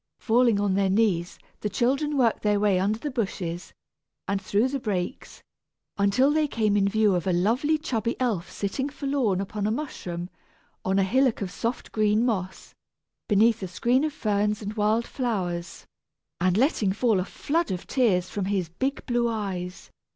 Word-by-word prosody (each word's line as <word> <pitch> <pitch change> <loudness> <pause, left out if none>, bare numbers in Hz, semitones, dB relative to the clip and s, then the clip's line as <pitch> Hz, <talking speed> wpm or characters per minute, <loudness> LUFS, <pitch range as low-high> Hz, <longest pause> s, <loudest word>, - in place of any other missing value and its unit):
Falling 235 -2 +3
on 200 -2 +1
their 195 0 +2
knees, 190 -4 +1 0.2
the 210 - -2
children 275 +8 0
worked 235 -4 +2
their 210 -1 +2
way 200 -3 +3
under 205 +3 +1
the 290 +5 -4
bushes 185 -7 -3 0.6
and 200 -1 -1
through 205 +5 +1
the 275 +1 -3
brakes, 205 0 -4 0.5
until 200 +8 +3
they 310 0 +2
came 215 -6 +1
in 200 -1 +3
view 215 0 +3
of 180 0 -1
a - - +3
lovely 235 - +2
chubby 235 -5 -2
elf 220 -9 -1
sitting 240 +8 -3
forlorn 275 -9 0
upon 200 +1 -2
a - - +1
mushroom 180 - -4 0.6
on 190 +1 +1
a 195 - +4
hillock 250 +2 +2
of 185 - -5
soft 235 +4 -3
green 215 +1 +2
moss, 190 -6 -3 0.6
beneath 220 +2 +4
a 190 - -3
screen 240 +9 +1
of 310 - 0
ferns 210 -4 0
and 205 +1 -4
wild 215 +2 +1
flowers, 180 -9 -3 0.5
and 185 +1 +2
letting 230 -6 +2
fall 220 0 +2
a - - 0
flood 325 - -1
of 185 -1 -4
tears 200 -9 +2
from 200 0 -3
his 190 -4 -1
big 265 - -3
blue 240 -1 +1
eyes. 190 -5 -5
210 Hz, 175 wpm, -26 LUFS, 190-245 Hz, 0.6 s, a